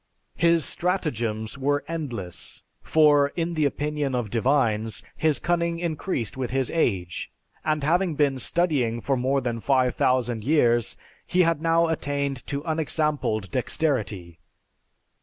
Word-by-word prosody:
His 170 -1 +3
stratagems 120 - -1
were 145 +1 +1
endless. 125 - -6 0.2
For, 150 -2 +4
in 170 0 -1
the 155 -2 +1
opinion 145 -1 -1
of 115 -5 -2
divines, 115 -3 +1
his 155 -2 +2
cunning 170 -1 0
increased 160 - -3
with 130 -2 -3
his 130 -1 -1
age; 95 - -1 0.3
and 155 -2 0
having 175 +2 +2
been 140 -3 +1
studying 135 -7 +1
for 135 +3 0
more 130 +2 +1
than 120 -2 -2
5000 125 -2 +1
years, 120 -5 +2 0.3
he 180 0 +3
had 165 -2 +1
now 165 0 +3
attained 140 -4 -2
to 140 0 -3
unexampled 150 - -1
dexterity. 110 - -2
140 Hz, 125 wpm, -25 LUFS, 120-160 Hz, 0.3 s, For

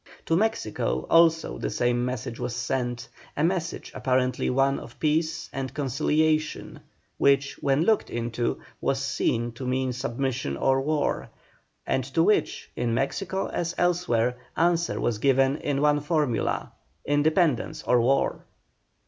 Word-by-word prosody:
To 165 - +2
Mexico 165 - 0
also 165 -1 +4
the - - -2
same 120 0 +1
message 125 -1 -4
was 120 - -3
sent, 120 -2 -2 0.3
a 150 - +1
message 170 -1 -1
apparently 130 -1 0
one 135 +2 +2
of - - -12
peace 160 +1 0
and 135 -1 -3
conciliation, 155 +3 0 0.4
which, 140 0 +2
when 140 +2 +2
looked 220 +3 +2
into, 120 0 -2 0.2
was 135 - 0
seen 120 -3 0
to 125 +2 -7
mean 130 0 0
submission 130 - -2
or 135 - +2
war, 150 +1 -1 0.6
and 130 - 0
to 165 - +5
which, 210 - +1
in 120 -1 0
Mexico 190 - -1
as 170 0 -2
elsewhere, 125 -10 +1 0.2
answer 170 0 +1
was 110 -3 -1
given 135 +2 +3
in 140 -2 -1
one 150 0 +4
formula, 145 -5 -1 0.3
independence 150 -1 +1
or 125 -1 +3
war. 135 +4 +1
135 Hz, 135 wpm, -26 LUFS, 125-160 Hz, 0.6 s, to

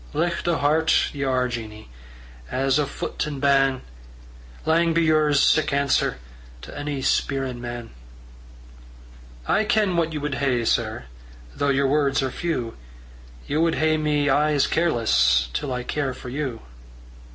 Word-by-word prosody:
"Licht 175 0 -1
o' 170 -2 +2
hert 155 +3 +2
ye 140 - -6
are, 130 -1 +1
Jeannie, 110 -3 -7 0.6
As 135 +2 +1
o' 145 - 0
foot - - -4
and 145 -2 -5
ban'! 135 -1 +2 0.8
Lang 165 +1 +2
be 170 - +3
yours 155 -2 +3
sic 155 +2 +3
answer 140 - +1 0.5
To - - -10
ony 145 -2 -4
spierin' 135 -3 -1
man." 120 -1 -7 1.6
"I 215 - +2
ken 210 -3 +1
what 165 -1 +1
ye 155 - -4
wad 145 -1 -3
hae, 125 -4 +1
sir, - - 0 0.5
Though 140 - 0
yer 140 0 +2
words 140 -1 +1
are 130 - -2
few; 125 -10 -3 0.7
Ye 145 - -2
wad 165 +1 +2
hae 155 0 +2
me 150 -1 0
aye 150 +2 +3
as 145 - +3
careless, 110 - +2
Till 140 - -3
I 125 -1 -3
care 135 -1 -2
for 125 - -9
you." 130 -3 -4
140 Hz, 150 wpm, -23 LUFS, 130-155 Hz, 1.6 s, be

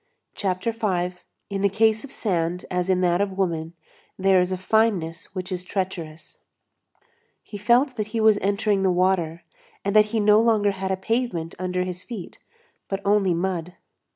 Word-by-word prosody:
CHAPTER 190 +3 -1
V—IN 195 -2 -4
THE 200 - +3
CASE 220 +2 +2
OF 280 - -10
SAND 175 -3 -1
AS 180 0 -1
IN 185 -1 +2
THAT 175 +1 +2
OF 200 -1 -1
WOMAN, 165 -4 -1 0.4
THERE 190 -1 +4
IS 180 +1 -1
A 185 - -1
FINENESS 185 -4 0
WHICH 185 0 -5
IS 180 -1 -3
TREACHEROUS 180 -4 -5 1.1
He 205 - -9
felt 250 +5 +3
that 215 -1 -2
he 225 +1 -3
was 220 -1 +5
entering 200 +1 +1
the 190 - +3
water, 175 -2 +1 0.4
and 200 +1 0
that 215 0 +7
he 220 +1 -2
no 210 +1 +5
longer 215 -3 +3
had 190 -1 -4
a 190 - 0
pavement 190 -5 -2
under 180 0 -1
his 180 0 -5
feet, 220 -6 -8 0.5
but 195 - -2
only 200 -3 +3
mud. 180 -1 -2
190 Hz, 170 wpm, -24 LUFS, 180-210 Hz, 1.1 s, that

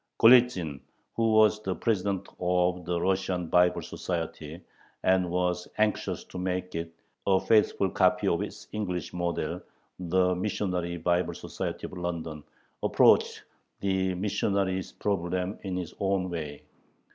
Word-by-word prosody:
Golitzin, 115 - +5 0.4
who 115 -1 +2
was 110 0 +5
the 95 -3 -2
president 100 -2 -1
of 90 0 +1
the 85 0 -1
Russian 95 -1 0
Bible 90 +2 +3
Society, 80 -2 -5 0.4
and 95 -1 +3
was 90 0 -1
anxious 110 0 0
to 90 - -8
make 90 0 -2
it 85 0 -4 0.4
a 95 -1 +5
faithful 105 -2 +3
copy - - +3
of - - +2
its - - -7
English 90 -5 -3
model, 85 -1 -2 0.4
the 90 +1 +2
Missionary 90 -2 -2
Bible 85 +2 0
Society - - -5
of - - -8
London, 85 -4 -4 0.4
approached - - +4 0.4
the 95 -1 0
missionary 95 0 0 0.2
problem 95 0 -1
in 95 -2 -4
his 90 -2 -5
own 95 -2 0
way. 75 -4 -5
90 Hz, 130 wpm, -28 LUFS, 90-95 Hz, 0.4 s, Golitzin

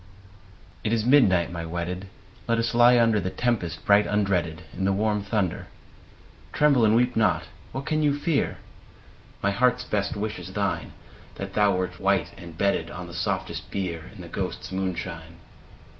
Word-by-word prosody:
I. - - -1
It 110 - +1
is 115 -1 +1
midnight, 100 - +4
my 85 -1 -4
wedded; 85 +3 -4 0.4
Let 115 0 +2
us 115 0 0
lie 120 +1 +6
under 115 -2 +4
The 95 - -2
tempest 115 -7 -2
bright 100 +1 +5
undreaded. 90 -5 0
In 95 - -4
the 100 - +3
warm 105 +1 +1
thunder: 100 -4 -1 0.9
(Tremble 140 -5 +4
and 110 +1 +4
weep 125 +1 +2
not 110 -3 +2
I - - -14 0.3
What 135 +1 -4
can 155 -1 0
you 145 -1 +2
fear?) 145 -1 0 0.9
My 100 - +3
heart's 125 +3 +2
best 100 -1 -1
wish 105 +1 -3
is - - -9
thine, - - -2 0.2
— - - -22
That 100 -1 -6
thou 100 -2 +3
wert 90 0 -3
white, 95 -4 +1
and 85 -4 -11
bedded 100 +2 +1
On - - -7
the - - -10
softest - - -3
bier. 85 -5 -4
In - - -10
the - - -9
ghosts* - - -4
moonshine. 85 -3 -4
100 Hz, 180 wpm, -25 LUFS, 90-115 Hz, 0.9 s, lie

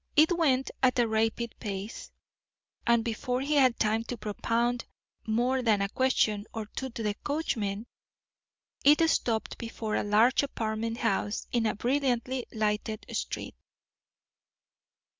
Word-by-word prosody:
It 315 +4 +5
went 270 -6 +2
at 255 0 +3
a 240 -1 +3
rapid 225 +1 0
pace, 200 +2 -5 0.8
and 235 -1 +4
before 245 +2 -1
he 285 +3 -1
had 260 -5 +4
time 220 +1 +1
to 245 - -5
propound 230 +3 -1 0.4
more 245 +4 +1
than 220 -4 +3
a 200 0 0
question 215 -4 +1
or 220 -1 -3
two 265 +5 -5
to 230 -2 -6
the 210 -1 0
coachman, 225 -9 -2 1.0
it 300 +3 +6
stopped 230 -8 0
before 225 -2 -4
a - - +1
large 215 +5 +4
apartment 225 -4 -2
house 205 -2 -1
in 235 -2 +2
a - - 0
brilliantly 255 0 0
lighted 215 0 -1
street. - - -3
230 Hz, 135 wpm, -29 LUFS, 215-255 Hz, 1.0 s, it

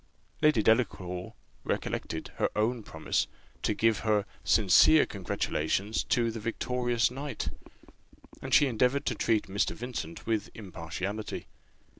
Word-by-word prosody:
Lady 150 -8 +4
Delacour 95 -6 +1 0.3
recollected - - -3
her - - +2
own 115 +3 +1
promise, 80 -6 -1 0.3
to - - 0
give 115 -1 +2
her 105 -2 +1 0.2
sincere 110 +9 +6
congratulations 95 +1 -1
to 115 -1 +1
the 115 - -6
victorious 120 +1 0
knight; 140 +2 -4 0.9
and - - -6
she 145 - +6
endeavoured 130 +3 +1
to - - +1
treat 110 -2 +1
Mr. 100 +2 -1
Vincent 115 -9 -6
with 110 -2 -1
impartiality. 100 +2 -5
110 Hz, 120 wpm, -29 LUFS, 100-120 Hz, 0.9 s, sincere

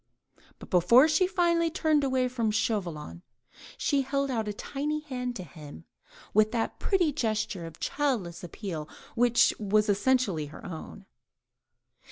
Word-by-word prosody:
But - - -13
before 235 - +6
she 360 +4 +3
finally 340 -2 +2
turned 315 -3 +1
away 260 -2 +1
from 240 -3 -1
Chauvelin, 170 - -2 0.6
she 285 -1 +1
held 275 0 -1
out 225 -3 -1
a - - -1
tiny 295 +7 -3
hand 250 -4 -4
to 185 - -5
him, 145 - -12 0.5
with 215 +1 +4
that 230 -2 -2
pretty 360 -6 +2
gesture 215 - -2
of 165 - -12
childish 220 - -1
appeal 170 -4 -6 0.2
which 240 0 +4
was 210 0 +2
so 210 - +2
essentially 205 - +1
her 155 +10 -12
own. 160 - -8
230 Hz, 145 wpm, -28 LUFS, 185-275 Hz, 0.6 s, before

